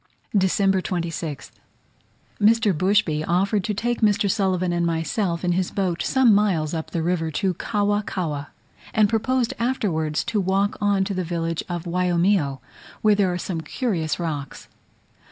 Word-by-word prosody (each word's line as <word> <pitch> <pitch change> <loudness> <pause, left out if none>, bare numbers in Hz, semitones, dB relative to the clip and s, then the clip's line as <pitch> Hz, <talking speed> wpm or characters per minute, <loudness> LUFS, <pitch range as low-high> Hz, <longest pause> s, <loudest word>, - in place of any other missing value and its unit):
December 195 0 +3
26th. 170 -5 -4 0.9
Mr. 220 -1 +4
Bushby 185 -3 +2
offered 195 +3 +1
to 210 +2 -2
take 240 +3 -1
Mr. 205 -1 +3
Sulivan 185 -3 +1
and 175 0 0
myself 170 +2 -1
in 175 - +2
his 180 +1 0
boat 185 -4 -1
some 260 -4 +4
miles 185 -7 +1
up 160 -1 -4
the 165 - -2
river 165 -1 0
to 185 +4 0
Cawa 205 +3 0
Cawa, 155 -8 -4 0.5
and 215 -2 +5
proposed 240 +3 0
afterwards 190 -12 0
to 225 -3 -1
walk 195 +2 +1
on 200 -1 +2
to 195 - -3
the 185 -1 -2
village 165 -1 -2
of 175 -2 -3
Waiomio, 175 -5 +1 0.4
where 215 -1 +5
there 200 -3 +2
are 175 - -2
some 175 -2 -4
curious 170 - -2
rocks. 150 -5 -5
185 Hz, 155 wpm, -23 LUFS, 170-205 Hz, 0.9 s, and